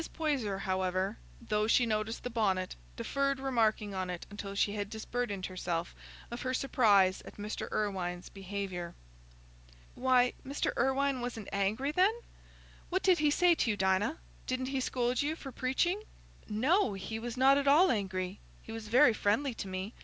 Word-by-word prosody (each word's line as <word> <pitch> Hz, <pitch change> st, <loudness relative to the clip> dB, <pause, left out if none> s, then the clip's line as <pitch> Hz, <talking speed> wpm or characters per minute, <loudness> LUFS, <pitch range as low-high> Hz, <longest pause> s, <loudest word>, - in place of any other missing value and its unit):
Poyser, 260 Hz, -, -1 dB
however, 185 Hz, +1 st, -1 dB, 0.2 s
though 215 Hz, -2 st, 0 dB
she 240 Hz, +2 st, +4 dB
noticed 215 Hz, 0 st, -2 dB
the 245 Hz, -, -4 dB
bonnet, 190 Hz, -5 st, 0 dB, 0.2 s
deferred 275 Hz, -, -1 dB
remarking 225 Hz, -6 st, +1 dB
on 185 Hz, -1 st, -3 dB
it 180 Hz, -1 st, -5 dB
until 200 Hz, -1 st, -6 dB
she 205 Hz, 0 st, +1 dB
had 205 Hz, -1 st, -3 dB
disburdened 220 Hz, -3 st, -3 dB
herself 175 Hz, -2 st, -3 dB, 0.4 s
of 235 Hz, -, -5 dB
her 255 Hz, 0 st, -1 dB
surprise 205 Hz, -8 st, +3 dB
at -, -, -12 dB
Mr. 210 Hz, +1 st, -5 dB
Irwine's 185 Hz, -4 st, -2 dB
behaviour. 190 Hz, -3 st, -5 dB, 1.0 s
"Why, 250 Hz, -1 st, +3 dB
Mr. 275 Hz, +2 st, -1 dB
Irwine 265 Hz, +1 st, +1 dB
wasn't 240 Hz, -4 st, -5 dB
angry, 210 Hz, +8 st, 0 dB
then? 375 Hz, +7 st, +3 dB, 0.7 s
What 375 Hz, +2 st, 0 dB
did 370 Hz, -2 st, +4 dB
he 300 Hz, 0 st, +4 dB
say 350 Hz, +4 st, +5 dB
to 285 Hz, -, 0 dB
you, 210 Hz, -, 0 dB
Dinah? 190 Hz, +10 st, +1 dB, 0.3 s
Didn't 255 Hz, 0 st, -1 dB
he 270 Hz, -, +1 dB
scold 250 Hz, -1 st, 0 dB
you 300 Hz, +2 st, -1 dB
for 275 Hz, -4 st, -8 dB
preaching?" 345 Hz, +11 st, 0 dB, 0.5 s
"No, 255 Hz, -, +2 dB
he 195 Hz, +3 st, -5 dB
was 240 Hz, +1 st, -5 dB
not 270 Hz, +2 st, +6 dB
at 280 Hz, -, -2 dB
all 315 Hz, +7 st, +6 dB
angry; 190 Hz, -3 st, -2 dB, 0.2 s
he -, -, -10 dB
was 225 Hz, -1 st, -6 dB
very 245 Hz, +2 st, +6 dB
friendly 225 Hz, +6 st, +1 dB
to 200 Hz, -, -6 dB
me. 190 Hz, +4 st, -4 dB
225 Hz, 165 wpm, -32 LUFS, 195-265 Hz, 1.0 s, not